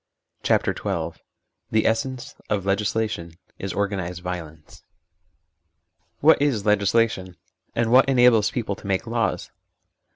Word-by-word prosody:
CHAPTEE - - +2
XII - - -3 0.5
THE 110 0 +1
ESSENCE 120 +3 -1 0.2
OF 100 -3 -1
LEGISLATION 100 -4 -1 0.2
IS 95 - -4
OKGANISED 95 -3 -2
VIOLENCE 80 -4 -7 1.4
WHAT 155 0 +5
is 130 -8 +1
legislation? 105 -2 +1 0.4
And 115 -1 +1
what 130 +2 +6
enables 120 -5 +5
people 110 -5 -3
to - - -11
make 95 +1 0
laws 115 0 -2
105 Hz, 110 wpm, -23 LUFS, 95-115 Hz, 1.4 s, what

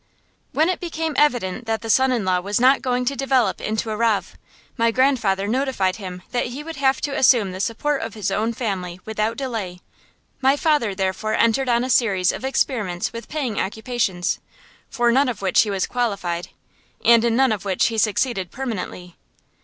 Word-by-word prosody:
When 315 - +2
it 365 - -1
became 325 -2 -3
evident 245 -6 +1
that 225 0 -1
the 225 - -5
son 265 +2 +4
in 235 -6 0
law 185 -1 +2
was 200 +4 -1
not 260 +3 +5
going 250 -1 0
to 275 +3 0
develop 260 -7 +1
into 220 +1 -2
a - - -2
rav, 210 -5 0 0.4
my 230 -2 +2
grandfather 230 -6 +1
notified 240 -6 0
him 180 -3 -8
that 245 -1 0
he 260 +5 -7
would 325 +1 -7
have 270 -1 +2
to 280 -2 -2
assume 235 -7 +4
the 185 - -7
support 270 +8 -1
of 225 -1 -5
his 205 -3 -2
own 220 +4 0
family 185 -7 -4
without 220 +1 -2
delay. 220 -10 -4 0.6
My 270 +2 +4
father 290 -11 +1
therefore 190 +3 -1
entered 240 +3 +2
on 235 0 +2
a 255 - -3
series 195 -7 +3
of - - -7
experiments 225 -10 -1
with 230 -1 -8
paying 265 -9 -2
occupations, 210 -3 -1 0.5
for 240 -1 +2
none 265 +2 +3
of 220 -5 -5
which 190 - +4
he 215 - -1
was 195 -2 0
qualified, 200 -8 -2 0.6
and 230 -1 +6
in 235 -1 +2
none 265 0 +4
of 210 -4 -2
which 195 -2 +1
he 225 -1 -2
succeeded 210 -3 0
permanently. 185 -8 -6
230 Hz, 190 wpm, -22 LUFS, 195-260 Hz, 0.6 s, and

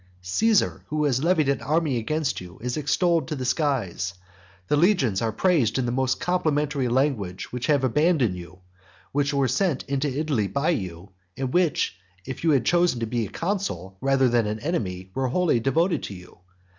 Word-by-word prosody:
Caesar, 215 - +2
who 150 0 -1
has 135 -1 +1
levied 165 -4 +3
an 140 0 +1
army 155 -3 +1
against 150 +4 -1
you, 90 -1 -11
is 125 +2 -3
extolled 165 +3 +1
to 155 - -3
the 130 -2 -4
skies. 125 - -1 0.5
The - - +2
legions 145 - +3
are 115 -1 0
praised 135 - +2
in 130 - 0
the 120 - -1
most 130 +1 0
complimentary 150 -6 0
language, 120 -8 -1
which 125 0 -3
have 145 -3 +3
abandoned 140 - +2
you, 90 +1 -11 0.5
which 140 0 +1
were 140 -2 +2
sent 135 +3 0
for 140 - -6
into 140 +1 0
Italy 140 -10 0
by 140 - 0
you; 95 - -4 0.3
and 130 -1 -3
which, 170 - +1 0.3
if 130 +2 -6
you 165 - +3
had 135 -6 +3
chosen 175 -7 +3
to - - +1
be 115 -1 -2
a - - -13
consul 135 - -3
rather 135 -1 +3
than 120 -3 +2
an 105 +1 -3
enemy, 95 - -3
were 135 -1 0
wholly 160 -1 +2
devoted 165 - +1
to 100 - -6
you. 90 -1 -14
135 Hz, 190 wpm, -25 LUFS, 115-155 Hz, 0.5 s, levied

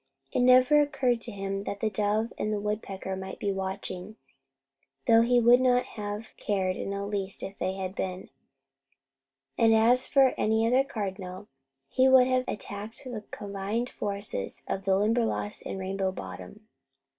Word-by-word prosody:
It - - 0
never 255 +4 +6
occurred 260 -5 +1
to 235 - -7
him 195 -1 -3
that 200 - -4
the 215 0 0
dove 215 +2 0
and 215 - -1
the 210 - -1
woodpecker 200 -2 -4
might 190 0 -6
be 200 - -1
watching, 190 +1 -5 0.9
though 225 0 +6
he 245 +1 +4
would 240 +2 +6
not 250 -1 +3
have 210 0 -6
cared 190 -3 -1
in - - -4
the 200 0 -3
least 200 -1 -4
if 195 - -6
they 185 - -1
had 190 -1 -4
been; 185 -4 -5 1.3
and 225 -1 +5
as 240 +3 +4
for 270 -2 +4
any 220 +1 +2
other 250 +3 +4
cardinal, 195 -5 -6 0.4
he 260 - +3
would 260 -1 +7
have 255 0 +1
attacked 205 +2 -5
the 240 -5 -6
combined 205 +4 -3
forces 200 - -4
of 195 0 -3
the 190 -1 +3
Limberlost 215 0 0
and - - -4
Rainbow 190 0 -1
Bottom. 95 - -9
210 Hz, 160 wpm, -28 LUFS, 195-235 Hz, 1.3 s, would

